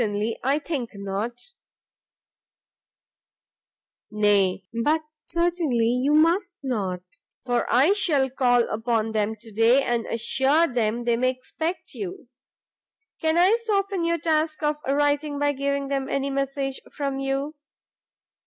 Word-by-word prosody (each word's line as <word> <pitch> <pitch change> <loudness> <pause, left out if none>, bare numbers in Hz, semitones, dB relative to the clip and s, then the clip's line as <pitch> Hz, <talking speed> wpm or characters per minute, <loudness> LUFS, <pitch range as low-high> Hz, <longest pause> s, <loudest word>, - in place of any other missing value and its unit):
"Certainly 215 0 -1
I 275 +3 +2
think 285 -7 -4
not." 205 - -5 2.6
"Nay, 200 -3 +2 0.2
but 310 +3 +2 0.2
certainly 335 -8 0
you 255 +5 +2
must 345 +5 +3
not, 200 -9 -2 0.4
for 245 -1 0
I 270 - +5
shall 305 -10 +2
call 245 -2 +3
upon 225 0 -1
them 215 0 0
to 220 +1 -15
day, 230 +6 +4
and 240 -2 -1
assure 265 +7 +2
them 240 -4 -1
they 235 -1 +1
may 255 +1 +2
expect 315 +7 -5
you. 375 -9 -7 0.9
Can 320 +1 +1
I 370 +5 +5
soften 395 -4 0
your 335 0 +1
task 310 -1 0
of 300 0 +1
writing 290 +1 +1
by 290 0 +2
giving 280 0 -2
them 275 -1 -2
any 275 0 -1
message 275 0 -2
from 275 -2 -3
you?" 275 +2 -2
270 Hz, 125 wpm, -24 LUFS, 235-310 Hz, 2.6 s, I